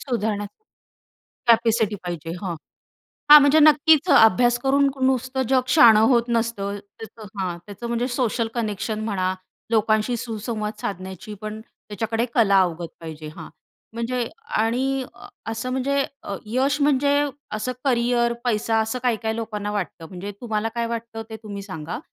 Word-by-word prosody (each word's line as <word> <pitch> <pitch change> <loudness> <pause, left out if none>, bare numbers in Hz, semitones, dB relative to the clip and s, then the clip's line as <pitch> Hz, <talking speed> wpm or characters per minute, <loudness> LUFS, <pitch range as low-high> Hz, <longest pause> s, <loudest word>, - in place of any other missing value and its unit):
सुधारणा, 220 -5 -2 1.0
कॅपॅसिटी 225 -2 +3
पाहिजे. 165 -2 -5
हां, 180 -3 -3 0.8
हां, 300 - +13
म्हणजे 285 +2 +5
नक्कीच 310 +2 +5
अ, - - +6
अभ्यास 240 +3 +3
करून 275 +1 +3 0.2
नुसतं 260 0 0
जग 260 -1 +4
शहाणं 235 -7 +7
होत 235 -1 +3
नसतं. 225 -4 -1 0.2
त्याचं 220 -1 -10
हां 180 -2 -2
त्याचं 205 +3 -7
म्हणजे 235 +1 -1
सोशल 235 -2 0
कनेक्शन 215 -2 -3
म्हणा, 185 -3 -1 0.4
लोकांशी 220 +2 +2
सुसंवाद 220 -2 -4
साधण्याचीपण 205 +3 -6
त्याच्याकडे 225 +1 -4
कला 200 -5 +4
अवगत 170 -2 -2
पाहिजे 160 -2 -8
हां, 165 -3 -9 0.4
म्हणजे 235 +1 -2 0.3
आणि 260 +4 0
अ 240 +1 -14 0.3
असं 225 +3 -4
म्हणजे 275 +2 0 0.2
अ, 200 - -4
यश 265 +6 0
म्हणजे 285 0 +3 0.4
असं 215 +4 -2
करियर, 240 -2 +2
पैसा 225 -1 +1
असं 220 +3 -2
काही-काही 225 -2 0
लोकांना 210 -2 -4
वाटतं 190 -5 -4
म्हणजे 190 +2 -7
तुम्हाला 225 -2 -1
काय 235 0 0
वाटतं 230 -1 -5
ते 220 - -6
तुम्ही 200 -2 -6
सांगा? 165 -2 -6
225 Hz, 140 wpm, -23 LUFS, 205-245 Hz, 1.0 s, हां